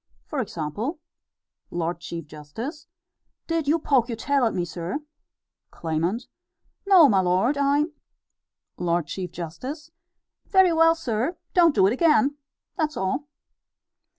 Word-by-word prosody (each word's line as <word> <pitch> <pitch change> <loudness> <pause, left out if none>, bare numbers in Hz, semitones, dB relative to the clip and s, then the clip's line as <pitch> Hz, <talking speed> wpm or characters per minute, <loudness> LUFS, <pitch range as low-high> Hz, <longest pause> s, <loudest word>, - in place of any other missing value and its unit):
For 300 - -4
example: 210 - -3 0.7
Lord 170 0 -2
Chief 170 -2 -6
Justice: 220 - -8 0.6
Did 330 -3 -1
you 310 +3 +4
poke 265 -6 +2
your 230 - -2
tail 275 +3 +1
at 225 - +1
me, 175 -2 0
sir? 175 - -4 0.7
Claimant: 170 +8 -2 0.6
No, 365 -6 +8
my 200 -7 +3
lord; 185 +9 +2
I 280 +1 +2 0.9
L. 170 -1 +1
C. 185 +3 -4
J.: 170 -1 -6 1.0
Very 380 -3 +5
well, 330 0 +5
sir; 270 +1 -2 0.2
don't 340 -4 +5
do 190 - +5
it 200 - +3
again 290 -1 +3 0.4
that's 310 -4 -1
all. 260 +10 -2
240 Hz, 125 wpm, -25 LUFS, -, 1.0 s, No